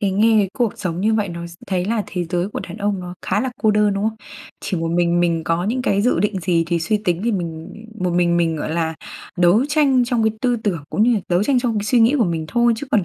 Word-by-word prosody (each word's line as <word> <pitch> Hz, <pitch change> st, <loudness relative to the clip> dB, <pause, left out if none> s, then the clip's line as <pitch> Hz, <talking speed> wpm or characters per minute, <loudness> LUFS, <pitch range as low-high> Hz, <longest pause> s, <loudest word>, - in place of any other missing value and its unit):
Cái 200 Hz, -3 st, +1 dB
nghe 220 Hz, +3 st, +3 dB
cái 200 Hz, -2 st, +2 dB
cuộc 235 Hz, -4 st, 0 dB
sống 175 Hz, -2 st, -3 dB
như 220 Hz, +2 st, +2 dB
vậy 210 Hz, -3 st, 0 dB
nó 170 Hz, 0 st, -6 dB
s 170 Hz, -, -12 dB
thấy 180 Hz, -2 st, -1 dB
là 220 Hz, 0 st, 0 dB
thế 180 Hz, -2 st, -3 dB
giới 175 Hz, +2 st, -2 dB
của -, -, -5 dB
đàn 180 Hz, -, -8 dB
ông 205 Hz, -2 st, -1 dB
nó 180 Hz, 0 st, -7 dB
khá -, -, 0 dB
là 260 Hz, -, -2 dB
cô 215 Hz, -, +4 dB
đơn, 210 Hz, -1 st, +2 dB
đúng 200 Hz, +1 st, -2 dB
không? 220 Hz, -, -8 dB, 0.4 s
Chỉ 185 Hz, -, -3 dB
một 165 Hz, 0 st, -2 dB
mình 175 Hz, 0 st, +2 dB
mình 170 Hz, -2 st, 0 dB
có 165 Hz, +2 st, 0 dB
những 250 Hz, +5 st, -1 dB
cái 200 Hz, -4 st, +1 dB
dự 245 Hz, -7 st, +2 dB
định 200 Hz, -1 st, 0 dB
gì 165 Hz, -1 st, +1 dB
thì 170 Hz, 0 st, 0 dB
suy 210 Hz, +6 st, 0 dB
tính 175 Hz, -1 st, 0 dB
thì 235 Hz, -, +1 dB
mình 165 Hz, -4 st, -4 dB, 0.3 s
một 180 Hz, -1 st, 0 dB
mình 175 Hz, -1 st, +2 dB
mình, 165 Hz, -2 st, +1 dB
gọi 150 Hz, -, -4 dB
là, 160 Hz, -1 st, -1 dB, 0.4 s
đấu 180 Hz, +8 st, +4 dB
tranh 280 Hz, -5 st, +3 dB
trong 240 Hz, -2 st, 0 dB
cái 220 Hz, -, +2 dB
tư 245 Hz, -2 st, +1 dB
tưởng 190 Hz, -9 st, -3 dB
cũng 210 Hz, -, +1 dB
như 240 Hz, +1 st, +4 dB
là 210 Hz, -, 0 dB
đấu 180 Hz, +3 st, +2 dB
tranh 260 Hz, +2 st, +2 dB
trong 230 Hz, -4 st, 0 dB
cái 205 Hz, -, -3 dB
suy 240 Hz, +2 st, +3 dB
nghĩ 230 Hz, +6 st, +4 dB
của 230 Hz, -, +4 dB
mình 165 Hz, -2 st, -2 dB
thôi 240 Hz, 0 st, +3 dB
chứ 280 Hz, +5 st, -6 dB
còn 200 Hz, -5 st, +2 dB
195 Hz, 290 wpm, -20 LUFS, 175-220 Hz, 0.4 s, cô